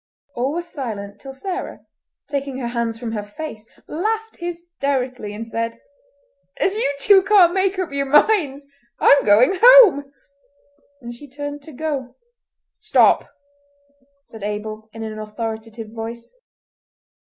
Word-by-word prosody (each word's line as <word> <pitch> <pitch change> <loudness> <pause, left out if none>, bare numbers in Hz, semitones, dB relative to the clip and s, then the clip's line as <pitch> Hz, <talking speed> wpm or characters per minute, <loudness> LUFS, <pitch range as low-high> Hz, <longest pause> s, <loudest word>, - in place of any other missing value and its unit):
All 255 +3 -1
were 345 +1 -2
silent 215 -11 -7
till 270 - -8
Sarah, 365 +8 -6 0.5
taking 280 -2 -3
her 245 -3 -3
hands 235 -1 -2
from 230 -1 -5
her 215 -2 -3
face 215 +1 -8 0.2
laughed 445 +6 -3
hysterically 280 - -3
and 215 +2 -6
said: 230 0 -4 0.8
"As 385 - +1
you 350 -10 0
two 390 +5 +6
can't 375 -3 +5
make 385 0 +1
up 370 -4 -2
your 280 0 -1
minds, 295 -2 +3 0.3
I'm 280 - +6
going 245 - +4
home!" 450 - +8 0.9
and 240 0 -7
she 285 +4 -13
turned 290 +2 -6
to 315 - -12
go. 270 -3 -4 0.6
"Stop," - - +3 0.9
said 225 -5 -13
Abel, 215 +1 -5
in 225 +1 -8
an 215 -1 -6
authoritative 220 +1 -6
voice. 230 - -7
270 Hz, 130 wpm, -21 LUFS, 225-340 Hz, 0.9 s, home